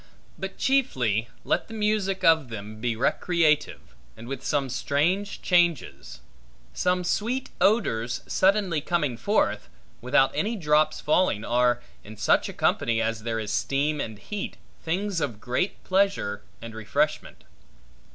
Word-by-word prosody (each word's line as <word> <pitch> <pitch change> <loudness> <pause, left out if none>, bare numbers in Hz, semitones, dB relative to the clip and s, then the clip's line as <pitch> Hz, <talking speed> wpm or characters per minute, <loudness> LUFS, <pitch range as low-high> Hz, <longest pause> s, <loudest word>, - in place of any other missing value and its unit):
But 195 0 -6
chiefly, 125 - +1
let - - 0
the 225 - -9
music 210 -3 0
of 160 -7 +4
them 110 0 -8
be 120 -1 0
recreative, 155 +5 +1 0.2
and 115 +1 -10
with 135 0 -5
some 140 -1 0
strange 165 +10 -1
changes. 170 - +1 0.5
Some 180 0 +1
sweet 240 +8 -1
odors 120 - +1
suddenly 190 -5 +2
coming 150 -6 0
forth, 200 - 0 0.3
without - - +3
any 220 +3 -1
drops 155 -5 +2
falling, 150 - +1
are, 120 0 +2 0.2
in 110 +1 -11
such 105 - +2
a - - -7
company 115 -1 +1
as 115 -1 -1
there 115 0 -2
is 105 -1 -3
steam 145 +4 0
and 110 -2 -5
heat, 205 - -6 0.3
things 180 +1 -1
of 120 -8 -3
great 125 - -2
pleasure 190 - +1 0.2
and 115 -1 -8
refreshment. 110 -1 -2
150 Hz, 135 wpm, -26 LUFS, 115-190 Hz, 0.5 s, of